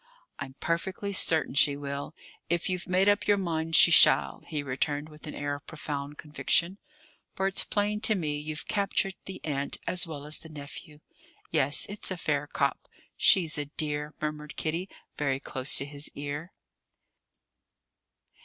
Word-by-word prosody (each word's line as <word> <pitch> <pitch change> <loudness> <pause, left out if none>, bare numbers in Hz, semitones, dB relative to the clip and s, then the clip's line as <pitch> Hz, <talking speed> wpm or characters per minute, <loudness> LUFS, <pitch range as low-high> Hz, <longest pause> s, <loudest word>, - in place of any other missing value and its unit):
"I'm 135 -2 -6
perfectly 190 +4 -2
certain 160 -7 +2
she 140 0 +4
will, 140 +1 -5 0.3
if 170 +2 0
you've 180 0 -3
made 185 +2 +3
up 205 0 +3
your 205 -1 +5
mind 165 -3 -1
she 170 - +8
shall," - - +6
he 150 -3 -3
returned, 145 +3 -2
with 150 0 -12
an - - -6
air 145 0 -2
of 145 - -8
profound 145 -2 -5
conviction; 170 +5 0 0.6
"for 190 - -1
it's 195 0 +3
plain 210 0 0
to 215 0 +4
me 150 -5 -2
you've 155 +1 -5
captured 195 -1 +1
the 190 - -6
aunt 140 -2 -2
as 180 -2 +1
well 145 -3 -7
as 150 +1 +3
the 160 - -10
nephew. 150 0 -10 0.5
Yes, 145 -3 +3
it's 205 +1 -5
a 185 - -3
fair 145 -3 -1
cop." 140 -1 -1 0.3
"She's 165 -5 +4
a 145 - -2
dear," 150 0 -2
murmured 150 0 -4
Kitty, 170 +4 -2 0.3
very 135 -2 0
close 135 -1 0
to 140 - 0
his 145 +1 -6
ear. 145 +5 -5
155 Hz, 165 wpm, -28 LUFS, 145-175 Hz, 0.6 s, she